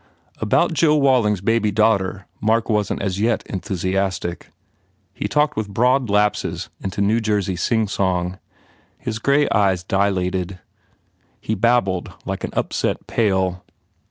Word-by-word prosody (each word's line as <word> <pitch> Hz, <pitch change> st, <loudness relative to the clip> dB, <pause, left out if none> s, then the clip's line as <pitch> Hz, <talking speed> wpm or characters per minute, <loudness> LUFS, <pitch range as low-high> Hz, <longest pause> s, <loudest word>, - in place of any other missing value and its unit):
About 110 Hz, +11 st, +2 dB
Joe 155 Hz, 0 st, +3 dB
Waiting 130 Hz, -7 st, +3 dB
s 90 Hz, -, -11 dB
baby 115 Hz, +1 st, +2 dB
daughter 100 Hz, -2 st, +1 dB, 0.2 s
Mark 110 Hz, +2 st, +1 dB
wasn 105 Hz, -1 st, 0 dB
t -, -, -5 dB
as 100 Hz, -1 st, -2 dB
yet 115 Hz, +1 st, +1 dB
enthusiastic. 95 Hz, -1 st, -2 dB, 0.6 s
He -, -, -3 dB
talked 150 Hz, 0 st, +1 dB
with 110 Hz, -2 st, -3 dB
broad 125 Hz, +3 st, +2 dB
lapses 105 Hz, +1 st, 0 dB
into 95 Hz, +1 st, -3 dB
New 105 Hz, +3 st, +3 dB
Jersey 105 Hz, -3 st, 0 dB
singsong. 95 Hz, -2 st, 0 dB, 0.6 s
His 110 Hz, -, -4 dB
grey 140 Hz, +4 st, +3 dB
eyes 95 Hz, -5 st, +2 dB
di 100 Hz, +3 st, +1 dB
lated. 90 Hz, -1 st, -2 dB, 0.8 s
He 110 Hz, -, -3 dB
babbled 105 Hz, -4 st, +1 dB
like -, -, -4 dB
an -, -, -2 dB
upset -, -, -1 dB
pail. 95 Hz, -5 st, 0 dB
105 Hz, 135 wpm, -21 LUFS, 95-115 Hz, 0.8 s, Joe